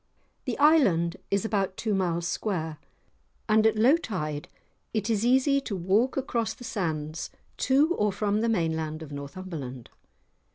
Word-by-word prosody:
The - - -2
island 200 - +4
is 200 +2 +1
about 195 -4 -1
two 215 -2 -1
miles 175 -3 0
square, 165 -6 -2 0.7
and 220 0 +5
at 220 - +2
low 255 +9 +5
tide 155 - -4 0.5
it 215 +1 0
is 215 -1 +1
easy 265 +3 +3
to 220 -6 -4
walk 195 +9 +1
across 235 -4 -1
the 250 - -12
sands 160 -7 -3 0.3
to 285 +6 +3
or 210 - +1
from 205 +1 0
the 230 - +1
mainland 160 -5 -1
of 150 - -10
Northumberland. 140 -3 -7
200 Hz, 150 wpm, -27 LUFS, 165-230 Hz, 0.7 s, and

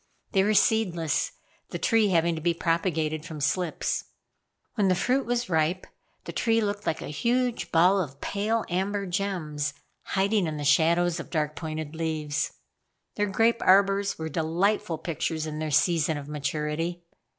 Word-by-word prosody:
They 195 -3 +3
were 210 +1 +2
seedless, 175 -9 +2 0.4
the - - -4
tree 225 -3 +3
having 170 -2 +2
to 160 - -5
be 170 +1 +1
propagated 165 -2 0
from 160 -2 -7
slips. 160 +4 -1 0.7
When 205 -4 +2
the 185 - +3
fruit 255 +8 +1
was 240 0 0
ripe 165 +2 +1 0.4
the - - -6
tree 230 -1 +2
looked 205 -1 -2
like 160 - -1
a - - -6
huge 240 - 0
ball 180 +4 +5
of 140 -5 -6
pale 215 +6 -1
amber 195 +3 -1
gems 170 -6 -2 0.3
hiding 200 -1 +1
in 155 -1 -3
the 145 - -4
shadows 165 +4 +3
of - - -7
dark 150 -2 -1
pointed 155 -2 -5
leaves. 155 -2 -2 0.6
Their 205 0 0
grape 225 +4 +2
arbors 195 +1 +4
were 160 - -4
delightful 165 +3 0
pictures 160 -1 -3
in 155 -1 -5
their 155 0 -2
season 155 +1 +2
of 145 -1 -7
maturity. 150 +4 -3
170 Hz, 160 wpm, -27 LUFS, 155-200 Hz, 0.7 s, ball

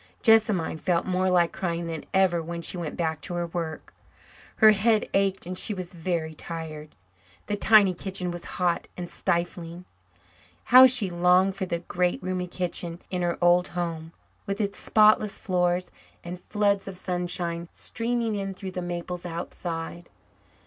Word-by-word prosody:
Jessamine 215 -8 +3
felt 170 +1 0
more 185 0 +1
like 175 -2 +3
crying 170 -2 -3
than 165 -2 -5
ever 185 -3 +3
when 170 +1 -6
she - - -1
went 170 -4 -5
back 160 -2 -1
to 175 - -5
her 175 0 -1
work. 165 -2 -5 0.6
Her 220 -1 +7
head 215 +1 +2
ached 195 -2 +1
and 180 +1 -5
she 210 +3 -2
was 185 -1 -6
very 165 -2 -2
tired. 155 -2 -7 0.5
The 205 - -1
tiny 205 -2 +6
kitchen 180 0 -3
was 175 0 -7
hot 175 -2 0
and 175 -1 -5
stifling. 175 -1 -3 0.8
How 255 +1 +9
she 235 -7 +3
longed 180 +2 +3
for 190 -2 -3
the 170 - -1
great, 180 +1 -1
roomy 185 0 -2
kitchen 175 -1 -4
in 180 -1 -1
her 175 -1 0
old 175 +1 +4
home, 165 -2 -4 0.4
with 200 +1 -3
its 200 -2 -2
spotless 215 -1 +4
floors 180 -1 0 0.3
and 180 +1 -7
floods 200 -2 +1
of 190 -2 -6
sunshine 175 -2 -2
streaming 230 -1 -2
in 195 -2 -3
through 190 0 -6
the 180 - -4
maples 175 0 -5
outside. 170 0 -6
180 Hz, 160 wpm, -26 LUFS, 170-195 Hz, 0.8 s, How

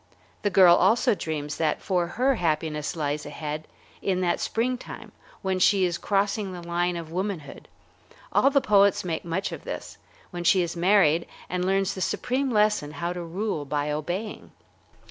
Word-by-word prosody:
The 205 - +1
girl 180 -3 +7
also 230 +6 +3
dreams 150 -6 -4
that 155 -2 0
for 180 -3 0
her 265 +3 +3
happiness 155 - -1
lies 145 -2 -2
ahead, 155 0 -5 0.3
in 185 -2 0
that 175 -1 +1
springtime 250 +2 -3 0.3
when 190 -1 0
she 190 0 +4
is 175 -1 -2
crossing 200 0 0
the 175 -1 -8
line 175 +1 0
of 165 -2 -6
womanhood, 185 -4 -4 0.7
all - - +5
the 280 0 +3
poets 200 -3 +4
make 165 -3 -2
much 175 +3 -2
of - - -7
this, - - -7 0.3
when 175 -1 -5
she 185 +1 +4
is 170 0 -4
married 170 -3 +3 0.2
and 180 0 -1
learns 195 +1 +1
the 190 - -6
supreme 260 +8 -1
lesson 210 -9 +2
how 170 +2 -3
to 180 - -5
rule 175 -1 -3
by 145 +1 -2
obeying. 175 +8 -4
180 Hz, 165 wpm, -26 LUFS, 165-200 Hz, 0.7 s, girl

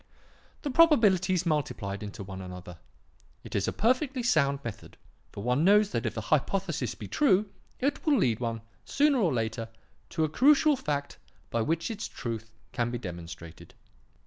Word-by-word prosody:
The 290 - -2
probabilities 200 - +4
multiplied 125 -11 -2
into 105 0 -7
one 95 0 -8
another. 90 -2 -9 0.6
It - - -10
is 100 -1 +1
a - - +1
perfectly 255 +3 +1
sound 140 - +3
method, 115 -3 -8 0.3
for 100 - -7
one 125 +5 +1
knows 205 +2 +5
that - - -1
if - - -5
a - - -1
hypothesis - - 0
be - - -8
true, 210 -8 +2 0.3
it 280 +3 -1
will 300 -3 +3
lead 120 - +2
one, 115 -2 -3 0.2
sooner 285 -2 +2
or 180 -8 +2
later, 115 -1 -2 0.4
to 160 - -1
a - - +2
crucial 290 - +4
fact 145 - -3 0.3
by 115 - 0
which 165 - -1
its 215 -1 -4
truth 115 -1 -6 0.2
can 120 -2 -1
be 120 - -3
demonstrated. 85 -4 -9
150 Hz, 165 wpm, -28 LUFS, -, 0.6 s, knows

